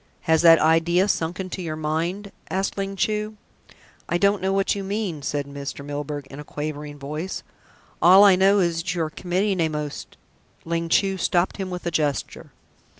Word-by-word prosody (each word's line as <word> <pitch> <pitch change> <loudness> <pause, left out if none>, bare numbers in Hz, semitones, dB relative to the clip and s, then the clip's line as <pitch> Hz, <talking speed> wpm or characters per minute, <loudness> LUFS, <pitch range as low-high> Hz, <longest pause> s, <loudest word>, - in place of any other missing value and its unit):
"Has 160 -1 +2
that 165 -1 +8
idea 165 +4 +3
sunk 170 -3 -1
into 185 0 -5
your 160 -3 -4
mind?" 165 +6 -2 0.2
asked 195 +1 -1
Ling 195 0 -3
Chu. 215 +2 -1 0.7
"I 175 - +2
don't 200 +2 +2
know 190 +1 0
what 195 0 +1
you 200 - -4
mean," 195 -6 -3
said 145 0 -2
Mr. 140 0 -7
Milburgh 145 0 -5
in 140 - -9
a - - -7
quavering 150 0 -6
voice. 150 +6 -5 0.6
"All 185 +3 +8
I 200 -2 +7
know 195 +2 +4
is 170 -4 +1
that 175 +2 -2
you 170 - 0
are 155 - -4
committing 185 +3 -1
a 160 -1 +2
most 150 -1 -6 0.2
" - - -36
Ling 165 0 -2
Chu 195 +1 +2
stopped 175 +1 +1
him 190 -2 -4
with 180 -1 -6
a 170 - -1
gesture. 150 -3 -2
170 Hz, 190 wpm, -23 LUFS, 155-195 Hz, 0.7 s, that